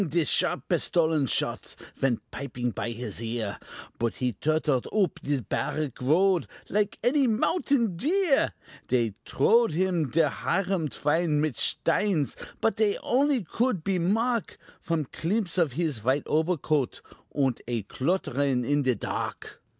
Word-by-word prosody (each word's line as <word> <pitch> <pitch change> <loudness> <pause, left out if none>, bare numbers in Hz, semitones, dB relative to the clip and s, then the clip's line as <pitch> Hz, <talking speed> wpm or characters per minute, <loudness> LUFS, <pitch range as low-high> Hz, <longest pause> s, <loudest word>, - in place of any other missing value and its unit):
de 165 +1 +1
sharp - - +1
pistolen 160 -4 +2
shots - - -2 0.2
Vent 130 -4 0
pipin 125 -3 -4
py 115 - -3
his 115 -2 -5
ear, 115 -4 -3 0.4
Boot 115 -1 0
he 125 -2 -1
tortled 150 - 0
oop 200 -6 +1
de 140 -3 -1
barrick 140 +6 -3
road 175 +7 +3 0.2
Like 205 0 0
any 270 +2 +3
mountain 235 - +1
deer: 325 - +2 0.4
Dey 120 -3 +1
trowed 225 - +3 0.4
der 160 -2 +4
Hiram 165 - -1
Twine 150 +2 +1
mit 150 -2 +1
shteins, 180 -9 +1 0.3
But 225 - +1
dey 210 -2 +2
only 270 -1 +2
could 215 0 -1
be 190 -1 0
mark 225 +5 0 0.2
Von 165 -3 -1
climpse 185 - -1
of 160 -7 +2
his 155 -5 -1
vhite 130 +6 0
obercoadt, 155 -4 0 0.3
Und 135 -4 0
a 120 -3 -2
clotterin 135 - 0
in 145 +2 +2
de 130 -3 +2
tark. - - -5
155 Hz, 135 wpm, -27 LUFS, 130-195 Hz, 0.4 s, der